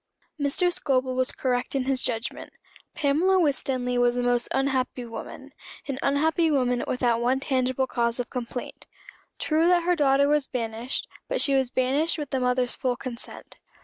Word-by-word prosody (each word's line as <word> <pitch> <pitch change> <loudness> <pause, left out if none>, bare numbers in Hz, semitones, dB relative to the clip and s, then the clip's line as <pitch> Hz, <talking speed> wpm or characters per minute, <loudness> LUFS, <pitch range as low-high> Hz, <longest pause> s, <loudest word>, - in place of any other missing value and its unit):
Mr. 295 +5 +2
Scobel 260 -4 0
was 255 0 +1
correct 250 0 -2
in 270 - +1
his 260 -1 0
judgment. 225 +2 -3 0.4
Pamela 330 +7 +2
Winstanley 260 -5 0
was 245 0 +3
a 245 - 0
most 245 0 +2
unhappy 265 -2 0
woman 230 -1 -9 0.4
an 270 -2 -3
unhappy 320 +4 +2
woman 250 -4 +1
without 240 -2 +1
one 255 +2 +2
tangible 260 -1 0
cause 235 -1 0
of 245 - -2
complaint. 245 -1 -6 0.5
True 320 +2 +2
that 355 -1 +4
her 355 +1 +2
daughter 280 -2 +3
was 295 -1 +2
banished; 230 0 -3 0.2
but - - -1
she 280 - +3
was 265 -2 +2
banished 270 +7 +1
with 295 -2 -5
the 265 - 0
mother's 250 0 +1
full 255 -2 -1
consent. 245 -1 -7
260 Hz, 165 wpm, -26 LUFS, 245-285 Hz, 0.5 s, that